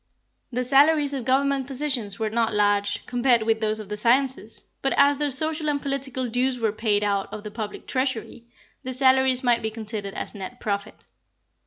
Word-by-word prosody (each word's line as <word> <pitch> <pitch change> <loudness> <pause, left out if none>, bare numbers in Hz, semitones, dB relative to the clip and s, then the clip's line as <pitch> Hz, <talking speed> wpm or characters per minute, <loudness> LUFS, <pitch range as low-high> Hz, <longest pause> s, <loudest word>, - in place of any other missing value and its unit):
The 250 +1 -1
salaries 285 +3 +4
of 260 -4 -4
Government 270 0 +1
positions 260 -7 -2
were 220 -2 -2
not 225 -1 0
large, 205 0 +1
compared 245 -2 +2
with 220 0 +1
those 215 0 0
of 215 - -8
the 210 - -4
sciences; 240 +1 0 0.2
but 270 - 0
as 280 0 +4
their 295 -1 0
social 310 +3 0
and 290 -1 0
political 270 -2 -2
dues 250 +2 0
were 225 -3 0
paid 210 -1 +1
out 200 -1 -1
of 215 -1 -7
the 210 - -7
public 215 -1 -6
treasury, 255 -3 -3 0.4
the 255 - -5
salaries 260 0 +3
might 240 -2 +3
be 220 - -2
considered 215 -2 -6
as - - -5
net 205 +5 -8
profit. 200 -1 -3
245 Hz, 185 wpm, -24 LUFS, 215-270 Hz, 0.4 s, salaries